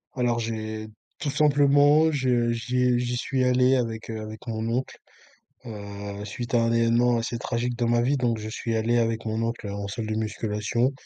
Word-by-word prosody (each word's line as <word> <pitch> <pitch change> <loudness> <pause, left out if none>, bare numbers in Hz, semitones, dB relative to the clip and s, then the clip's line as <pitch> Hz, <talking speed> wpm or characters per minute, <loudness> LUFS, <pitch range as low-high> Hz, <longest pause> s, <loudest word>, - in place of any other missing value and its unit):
Alors 120 -2 +1
j'ai 110 -1 -4 0.3
tout 150 - -2
simplement 145 +1 +4
j'ai 125 -4 +1
j'ai 125 +2 +1
j'y 125 0 -1
suis 130 +1 -1
allé 125 +1 +4
avec, 115 -3 -2
heu 110 -1 -4
avec 110 0 -8
mon 110 -1 -3
oncle, 125 +3 -2 0.7
heu, 100 -2 -7
suite 120 +3 -5
à 120 - +4
un 115 0 +2
événement 115 +1 +3
assez 115 +1 -3
tragique 120 0 -2
dans 120 -1 0
ma 120 0 +3
vie 135 +4 +2
donc 120 -3 0
je 110 0 -6
suis 115 +1 -2
allé 115 +2 +2
avec 115 -1 0
mon 110 0 -2
oncle 115 -1 -3
en 100 0 -4
salle 110 +2 -4
de 110 - -2
musculation. 110 +3 -1
115 Hz, 190 wpm, -25 LUFS, 110-125 Hz, 0.7 s, simplement